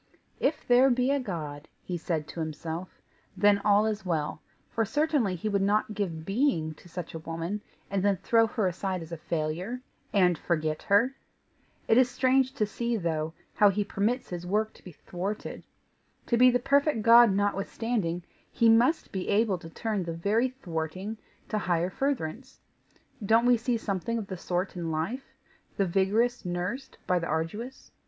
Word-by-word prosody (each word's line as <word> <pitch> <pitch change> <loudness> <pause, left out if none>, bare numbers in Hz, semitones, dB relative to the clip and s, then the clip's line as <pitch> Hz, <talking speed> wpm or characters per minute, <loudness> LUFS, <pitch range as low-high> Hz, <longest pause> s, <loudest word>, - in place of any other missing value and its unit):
"If 295 +3 0
there 250 +2 +6
be 250 +1 +2
a 280 - +2
God," 155 - -5 0.2
he 180 - -4
said 160 -3 -2
to - - -7
himself, 160 +3 -5 0.4
"then 205 +1 +5
all 205 +1 +4
is 215 -2 -2
well, 160 -5 -2 0.3
for 225 - +1
certainly 290 -5 +1
he 180 +5 -4
would 200 -2 +1
not 210 +2 +1
give 170 -6 -3
being 195 - +1
to 175 - -17
such 180 0 -6
a 160 - -5
woman, 165 +5 -4 0.3
and 195 -1 -1
then 200 0 +2
throw 225 +4 +3
her 220 -2 -1
aside 185 0 -2
as 165 - -12
a 170 - -4
failure, 165 +9 -3 0.3
and 180 -5 +3
forget 155 -2 -1
her. 230 +7 +3 0.7
It 225 - +5
is 255 -1 +4
strange 260 +1 +2
to 215 - +1
see, 235 +3 -2
though, 160 -3 -2 0.2
how 205 - +5
he 205 +1 0
permits 220 +6 -1
his 175 -1 -5
work 210 +4 0
to - - -19
be 180 - -10
thwarted. 190 +7 -5 0.6
To 235 - +1
be 250 +2 +7
the 245 - +3
perfect 280 -1 +2
God 235 0 +8
notwithstanding, 200 -2 -1 0.3
he 230 - +4
must 240 +8 +3
be 190 -2 -3
able 205 -3 +2
to 165 - -10
turn 215 +3 -2
the 170 -1 -4
very 210 +9 +1
thwarting 185 - -5 0.3
to 215 - 0
higher 175 -1 0
furtherance. 260 - -3 0.6
Don't 225 +4 +4
we 245 0 +6
see 235 +1 0
something 220 +2 -2
of 220 - -3
the 190 - -6
sort 180 +2 -2
in 170 -2 -3
life 165 +12 -3 0.4
the 195 - +2
vigorous 210 +7 +1
nursed 180 +9 -4
by 180 -1 +2
the 170 - -3
arduous? 185 +12 -4
200 Hz, 175 wpm, -28 LUFS, 170-235 Hz, 0.7 s, God